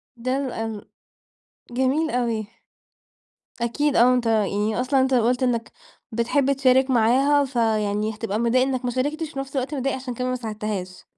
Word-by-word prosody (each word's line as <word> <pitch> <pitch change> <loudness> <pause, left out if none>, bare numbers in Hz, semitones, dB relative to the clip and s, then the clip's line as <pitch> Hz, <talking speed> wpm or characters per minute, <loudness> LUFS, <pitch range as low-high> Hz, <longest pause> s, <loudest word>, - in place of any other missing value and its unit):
ده 255 +3 -2
لن 225 -5 -4 0.9
جميل 265 +6 +1
أوي. 230 -5 -1 1.2
أكيد 285 +5 0
آه 250 +2 +6
أنت 245 -2 0
يعني 215 +1 +1
أصلًا 265 +1 +2
أنت 260 0 +2
قُلت 245 +2 +2
إنك 235 -2 0 0.4
بتحب 260 +4 +1
تشارك 265 0 +3
معاها 265 +5 +3
فيعني 215 -4 0
هتبقى 215 -1 -3
متضايق 235 +2 +2
إنك 255 -1 -2
ما 245 - 0
شاركتش 295 +6 -2
وفي 270 - -8
نفس 270 +1 -5
الوقت 265 +3 -2
متضايق 270 0 -1
عشان 255 -2 -6
كمان 250 +1 -2
ما 255 - -1
ساعدتهاش. 210 -5 -5
250 Hz, 155 wpm, -23 LUFS, 225-265 Hz, 1.2 s, آه